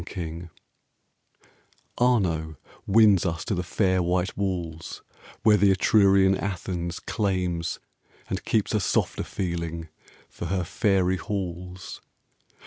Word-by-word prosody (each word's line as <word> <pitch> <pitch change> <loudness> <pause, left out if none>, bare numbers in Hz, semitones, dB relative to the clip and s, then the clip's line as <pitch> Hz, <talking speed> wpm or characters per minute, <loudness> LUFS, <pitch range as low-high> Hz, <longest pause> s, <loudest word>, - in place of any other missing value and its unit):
FLORENCE 85 -1 -6 1.5
Arno 85 -11 +1 0.3
wins 105 -3 +5
us 85 -3 -2
to 110 - -1
the 90 - -1
fair 95 +1 +1
white 90 +1 0
walls, 85 -5 -4 0.4
Where 105 -1 +6
the 100 0 +4
Etrurian 95 0 +4
Athens 90 -3 -3
claims 90 -5 -1 0.5
and - - -3
keeps 110 -1 0
A 105 - +3
softer 95 - 0
feeling 85 -3 -4 0.4
for - - -8
her 90 +1 0
fairy 95 0 +1
halls. 90 -2 -5
90 Hz, 110 wpm, -26 LUFS, 85-100 Hz, 1.5 s, Where